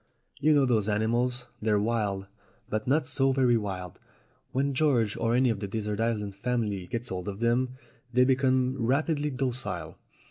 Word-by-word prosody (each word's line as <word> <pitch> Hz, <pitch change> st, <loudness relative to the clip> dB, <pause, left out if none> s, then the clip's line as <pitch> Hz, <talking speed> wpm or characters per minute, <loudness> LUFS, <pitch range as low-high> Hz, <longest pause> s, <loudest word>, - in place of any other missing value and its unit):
You 155 Hz, +1 st, +4 dB
know 140 Hz, -2 st, +4 dB
those 110 Hz, -4 st, +1 dB
animals? 120 Hz, +4 st, +1 dB, 0.2 s
They're 105 Hz, -1 st, +2 dB
wild, 105 Hz, -3 st, 0 dB, 0.4 s
but 110 Hz, +1 st, -3 dB
not 145 Hz, +2 st, +2 dB
so 135 Hz, 0 st, +1 dB
very 130 Hz, -2 st, +3 dB
wild. 95 Hz, -5 st, -4 dB, 0.5 s
When 140 Hz, +2 st, 0 dB
George, 130 Hz, -7 st, +2 dB
or 115 Hz, +1 st, +1 dB
any 125 Hz, -1 st, +4 dB
of 105 Hz, -, -3 dB
the 100 Hz, -, -4 dB
desert 105 Hz, 0 st, -3 dB
island 110 Hz, -3 st, -1 dB
family, 105 Hz, -4 st, -2 dB
gets 120 Hz, +3 st, -4 dB
hold 90 Hz, +1 st, -4 dB
of 100 Hz, 0 st, -5 dB
them, 125 Hz, +2 st, +1 dB, 0.3 s
they 125 Hz, +1 st, +4 dB
become 130 Hz, -1 st, +2 dB
rapidly 145 Hz, +4 st, +1 dB
docile. 125 Hz, -, -3 dB
120 Hz, 165 wpm, -28 LUFS, 105-130 Hz, 0.5 s, You